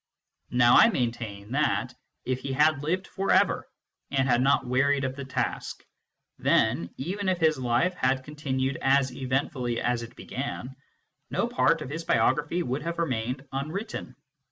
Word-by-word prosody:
Now 120 Hz, -1 st, +5 dB
I 230 Hz, -, +8 dB
maintain 115 Hz, -, -3 dB
that, 150 Hz, +3 st, 0 dB, 0.3 s
if 130 Hz, 0 st, -1 dB
he 135 Hz, 0 st, -4 dB
had 150 Hz, +1 st, +3 dB
lived 180 Hz, +6 st, -1 dB
for 195 Hz, 0 st, -4 dB
ever, -, -, +3 dB, 0.4 s
and 135 Hz, -1 st, +1 dB
had 120 Hz, -1 st, +3 dB
not 135 Hz, 0 st, +3 dB
wearied 140 Hz, +3 st, +2 dB
of 130 Hz, 0 st, -2 dB
his 140 Hz, -1 st, -7 dB
task, 130 Hz, -, -3 dB, 0.5 s
then, 85 Hz, -, +2 dB
even 190 Hz, +7 st, -2 dB
if 185 Hz, -, +1 dB
his 160 Hz, -4 st, +2 dB
life 125 Hz, +9 st, +1 dB
had 130 Hz, -5 st, 0 dB
continued 135 Hz, -2 st, -2 dB
as 135 Hz, -1 st, +3 dB
eventfully 130 Hz, -2 st, -1 dB
as 120 Hz, -1 st, 0 dB
it 115 Hz, +1 st, -9 dB
began, 130 Hz, 0 st, -5 dB, 0.5 s
no -, -, 0 dB
part -, -, +2 dB
of 130 Hz, -, -8 dB
his 165 Hz, +2 st, -4 dB
biography 165 Hz, +2 st, +1 dB
would 130 Hz, +2 st, -2 dB
have 170 Hz, +2 st, -4 dB
remained 130 Hz, -4 st, -2 dB
unwritten. 155 Hz, -, -5 dB
135 Hz, 155 wpm, -27 LUFS, 125-150 Hz, 0.5 s, I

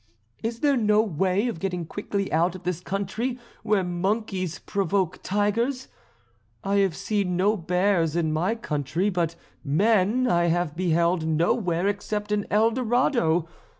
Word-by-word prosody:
Is 230 Hz, +1 st, -4 dB
there 285 Hz, -2 st, +3 dB
no 215 Hz, -1 st, +3 dB
way 190 Hz, +3 st, 0 dB
of 225 Hz, -9 st, -4 dB
getting 180 Hz, -3 st, -3 dB
quickly 200 Hz, +2 st, -3 dB
out 170 Hz, +3 st, +2 dB
of 185 Hz, -, -10 dB
this 180 Hz, -2 st, -2 dB
country 200 Hz, +7 st, -3 dB, 0.2 s
where 210 Hz, -3 st, +1 dB
monkeys 185 Hz, 0 st, -2 dB
provoke 195 Hz, -2 st, -1 dB
tigers? 230 Hz, +7 st, 0 dB, 0.7 s
I 200 Hz, +1 st, +1 dB
have 195 Hz, -5 st, +2 dB
seen 200 Hz, -4 st, -1 dB
no 205 Hz, +4 st, +3 dB
bears 180 Hz, -2 st, +1 dB
in 160 Hz, -2 st, +1 dB
my 180 Hz, +8 st, 0 dB
country, 165 Hz, -, -1 dB
but 170 Hz, -2 st, -1 dB, 0.3 s
men 210 Hz, -, +2 dB
I 175 Hz, -7 st, +3 dB
have 170 Hz, -2 st, 0 dB
beheld 170 Hz, -1 st, +1 dB
nowhere 170 Hz, +3 st, +1 dB
except 210 Hz, +1 st, -2 dB
in 210 Hz, -1 st, 0 dB
El 220 Hz, +2 st, +3 dB
Dorado. 235 Hz, -, +1 dB
190 Hz, 145 wpm, -25 LUFS, 170-210 Hz, 0.7 s, there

